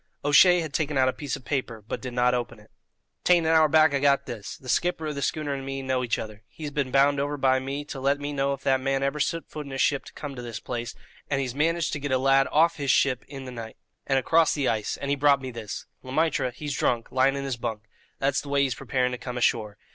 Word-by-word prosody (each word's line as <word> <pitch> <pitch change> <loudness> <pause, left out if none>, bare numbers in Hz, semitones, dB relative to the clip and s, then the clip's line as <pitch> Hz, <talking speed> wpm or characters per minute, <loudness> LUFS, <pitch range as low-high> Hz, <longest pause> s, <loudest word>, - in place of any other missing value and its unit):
O'Shea 175 +5 +6
had 155 -3 -6
taken 150 -2 -1
out 130 -1 +4
a - - -2
piece 145 -2 -4
of 135 -3 -12
paper, 125 -6 -3
but - - -4
did 130 -2 -6
not 125 0 +3
open 120 -2 -3
it. 105 - -20 0.5
"'Tain't 175 -2 +4
an 160 - +3
hour 160 -1 +6
back 155 -1 +5
I 140 - +2
got 140 0 +3
this. 110 -5 -7
The 130 - -15
skipper 165 +4 0
of 155 - -2
the 140 - -5
schooner 150 0 -1
and 135 -1 -4
me 135 0 -4
know 130 -1 0
each 115 -4 0
other. 105 -1 -7
He's 150 +2 -7
been 140 -2 -1
bound 140 +2 +3
over 145 +1 -1
by 130 -1 +3
me 135 +2 -4
to 145 - -7
let 140 +2 +1
me 145 0 -4
know 140 0 0
if 135 - -8
that 135 -1 +3
man 135 0 0
ever 140 +2 -1
set 165 +3 -1
foot 150 -2 -7
in - - -9
his 135 - -4
ship 140 -2 +1
to - - -12
come 145 -2 -7
to 125 - -6
this 115 -3 -6
place, 120 -1 -5 0.3
and 135 - +1
he's 130 -3 -2
managed 165 +3 0
to 145 - -2
get 145 -1 -4
a 130 - +3
lad 135 +1 +4
off 165 +2 +3
his 140 -2 -3
ship 130 -1 +3
in 135 -1 -8
the 130 - -7
noight, 115 -2 -8 0.3
and 135 - +2
across 160 +5 +3
the 140 -3 0
ice, 110 -2 -1
and 140 0 -3
he - - +3
brought 140 -1 +4
me 130 -1 -6
this. 115 -4 -6 0.2
Le 130 - -9
Maître, 155 -3 +1
he's 145 +4 -5
drunk, 120 -2 0
lyin' 130 +1 +3
in 140 - -3
his 135 -3 -3
bunk; 110 -2 -4 0.3
that's 140 0 +1
the 145 - -10
way 140 0 +3
he's 135 -2 0
preparing 125 +2 -1
to 125 - -5
come 125 -1 -6
ashore. 110 -3 0
135 Hz, 275 wpm, -26 LUFS, 125-145 Hz, 0.5 s, O'Shea